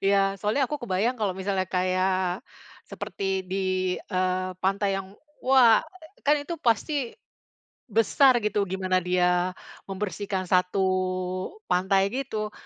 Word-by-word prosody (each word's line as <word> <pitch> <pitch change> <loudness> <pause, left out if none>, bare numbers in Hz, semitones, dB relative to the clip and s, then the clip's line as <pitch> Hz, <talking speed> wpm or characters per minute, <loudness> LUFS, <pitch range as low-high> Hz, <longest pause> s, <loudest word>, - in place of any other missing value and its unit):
Iya 200 +1 +3 0.2
soalnya 220 +7 +1
aku 295 +4 -3
kebayang 225 +4 0
kalau 200 -3 +1
misalnya 190 0 -1
kayak 185 +1 0 0.5
seperti 195 -1 -3
di, 185 +1 -4 0.5
eee, 185 0 0
pantai 195 +1 +1
yang 195 0 -7 0.3
wah, 255 -4 +6 0.4
kan 295 +1 +5
itu 340 +4 -5
pasti 255 0 0 0.7
besar 235 +3 +4
gitu 210 -1 0
gimana 185 0 0
dia 180 0 +1 0.3
membersihkan 195 0 -3
satu 180 +1 +2 0.9
pantai 190 +2 +3
gitu. 220 -6 -3
195 Hz, 115 wpm, -26 LUFS, 185-225 Hz, 0.9 s, wah